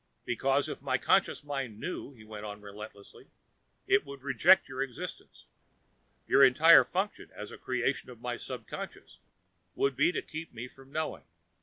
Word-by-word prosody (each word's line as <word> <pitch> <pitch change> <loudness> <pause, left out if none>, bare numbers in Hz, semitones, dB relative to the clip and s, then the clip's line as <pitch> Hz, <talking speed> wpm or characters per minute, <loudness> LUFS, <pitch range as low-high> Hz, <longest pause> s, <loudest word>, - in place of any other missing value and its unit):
"Because 135 +3 +1
if - - -6
my - - +1
conscious - - +2
mind 135 -7 -4
knew," 180 -2 -5
he 110 -4 -15
went 110 -1 -9
on 105 -1 -6
relentlessly, 105 0 -11 0.6
"it - - +4
would 140 -2 -10
reject 165 +7 +5
your 130 0 -4
existence. 135 -3 -6 0.8
Your 140 - +6
entire 155 +6 +8
function, 195 +3 -3
as 105 - -7
a - - -9
creation 130 +1 -1
of 120 -2 -11
my 120 0 -3
subconscious, 120 -2 -8 0.6
would 140 -1 +1
be 150 +6 +4
to - - -3
keep 160 0 -7
me 120 +2 -5
from 135 +1 -17
knowing. 155 +1 -3
130 Hz, 160 wpm, -30 LUFS, 115-145 Hz, 0.8 s, entire